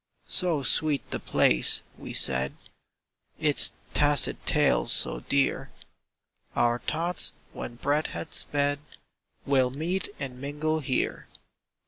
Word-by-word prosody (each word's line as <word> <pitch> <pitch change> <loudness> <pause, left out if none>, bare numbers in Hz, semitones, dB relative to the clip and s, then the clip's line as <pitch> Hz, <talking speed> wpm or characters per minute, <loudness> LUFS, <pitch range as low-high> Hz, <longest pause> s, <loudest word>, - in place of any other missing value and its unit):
"So 170 -6 0
sweet 150 +2 +4
the - - -3
place," 60 0 +2
we - - -10
said, 65 +1 +4 0.8
"Its - - +4 0.2
tacit 145 -2 +2
tales - - +2
so - - 0
dear, 140 - -1 0.9
Our 120 0 +1
thoughts, 170 +6 0 0.2
when 120 - -8
breath 145 +5 -1
has 160 - -7
sped, 145 0 0 0.7
Will 130 -2 +2
meet 165 +8 -4
and 130 -3 -7
mingle 150 +3 -3
here!" 130 -3 -3
140 Hz, 110 wpm, -26 LUFS, 125-155 Hz, 0.9 s, sweet